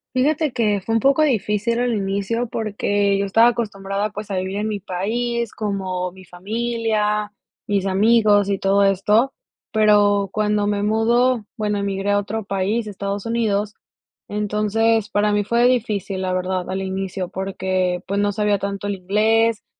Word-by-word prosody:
Fíjate 295 +2 +1
que 210 -3 +1
fue 225 +4 -2
un 225 - +2
poco 275 +5 +4
difícil 225 -3 0
al 245 -1 +1
inicio 200 +4 -1
porque, 205 -2 0
yo 200 - 0
estaba 225 +4 +5
acostumbrada 205 -3 -3
pues 210 0 -7
a 190 - -1
vivir 190 +1 -3
en 210 +1 -2
mi 210 -1 -3
país, 230 +5 -2
como 190 -3 -3
mi 190 - -14
familia, 210 +2 -2 0.3
mis 200 -2 0
amigos 205 +1 +4
y 200 -1 0
todo 195 +1 +3
esto, 210 +7 +2 0.4
pero, 205 -2 +4
cuando 210 0 0
me 205 -1 0
mudo, 230 +2 +2
bueno, 210 -2 -1
emigré 200 0 -1
a 205 - +3
otro 205 +1 -3
país, 200 +4 -1
Estados 200 0 -4
Unidos, 215 -3 0 0.6
entonces 210 +1 0
para 210 0 +1
mí 205 0 +2
fue 235 +3 +2
difícil 210 -6 -1
la 185 -1 -1
verdad 185 0 -2
al 190 +1 -2
inicio 190 -1 -3
porque, 185 -1 -2
pues, 200 - -2
no 205 0 +1
sabía 210 0 +1
tanto 200 0 -4
el 205 - -1
inglés, 220 +4 +1
205 Hz, 160 wpm, -21 LUFS, 195-225 Hz, 0.6 s, estaba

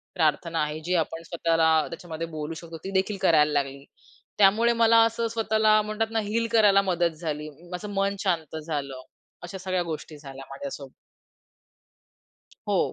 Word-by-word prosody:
प्रार्थना 165 0 +1
आहे, 150 +1 -3
जी 175 +3 -2
आपण 165 +1 -3
स्वतःला 165 -1 +1 0.2
त्याच्यामध्ये 165 -1 -6
बोलू 155 -1 -5
शकतो 165 -1 -9
ती 195 - -4
देखील 195 +2 0
करायला 150 -2 +4
लागली 140 -1 -2 0.6
त्यामुळे 215 +4 +5
मला 230 0 +4
असं 230 0 -1
स्वतःला 220 -1 +3
म्हणतात 215 +1 -2
ना 225 - +1
हील 225 +3 -1
करायला 205 -3 +6
मदत 175 -3 +1
झाली. 155 -1 -4 0.2
माझं 195 +4 -5
मन 200 0 0
शांत 165 -6 -1
झालं, 145 -4 -4 0.4
अशा 175 +2 -7
सगळ्या 185 -1 -1
गोष्टी 160 -2 -6
झाल्या 135 -2 -10
माझ्यासोबत. 140 -1 -7 1.8
हो, - - +1
170 Hz, 150 wpm, -26 LUFS, 155-210 Hz, 1.8 s, करायला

